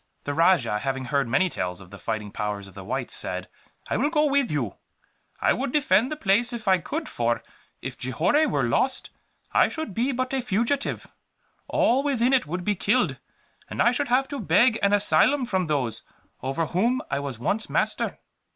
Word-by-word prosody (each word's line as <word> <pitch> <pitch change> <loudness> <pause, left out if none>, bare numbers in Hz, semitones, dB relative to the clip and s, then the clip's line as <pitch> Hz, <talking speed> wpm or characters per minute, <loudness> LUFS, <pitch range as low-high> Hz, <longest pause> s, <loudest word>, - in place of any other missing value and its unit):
The 145 - -3
rajah, 155 - +3
having 135 +2 -2
heard 140 -1 0
many 185 +11 +2
tales 90 - -3
of 95 -2 -14
the 100 - -10
fighting 105 +1 -4
powers 105 -1 -4
of 95 - -15
the 95 +1 -9
whites, - - -2
said: - - -2 0.4
"I - - -1
will 290 - +2
go 305 -1 +2
with 280 -3 +2
you. 135 -9 -2 0.6
I - - +3
would 265 +1 -2
defend 285 -4 +3
the - - -1
place 235 -1 +2
if 235 -3 -6
I 190 -1 +5
could 310 - -4
for, 120 0 -1 0.4
if - - -6
Johore 175 - +2
were 140 -2 0
lost, 255 - 0 0.4
I - - +5
should 315 -11 -5
be 245 +7 0
but 255 +1 -2
a 265 - +1
fugitive. 240 +5 -1 0.6
All 255 +4 +3
within 265 -3 +1
it 255 - +3
would 180 +3 -3
be 210 - +2
killed, 195 - +1 0.5
and - - -7
I 240 - +5
should 280 +3 -1
have 255 +2 +2
to 285 - -4
beg 235 -2 +3
an 200 - +3
asylum 245 +6 +3
from 190 -6 -1
those 135 -7 -1 0.4
over 135 +6 -1
whom 230 - 0
I 140 - 0
was 140 -4 -5
once 205 - -1
master." - - 0
195 Hz, 195 wpm, -25 LUFS, -, 0.6 s, I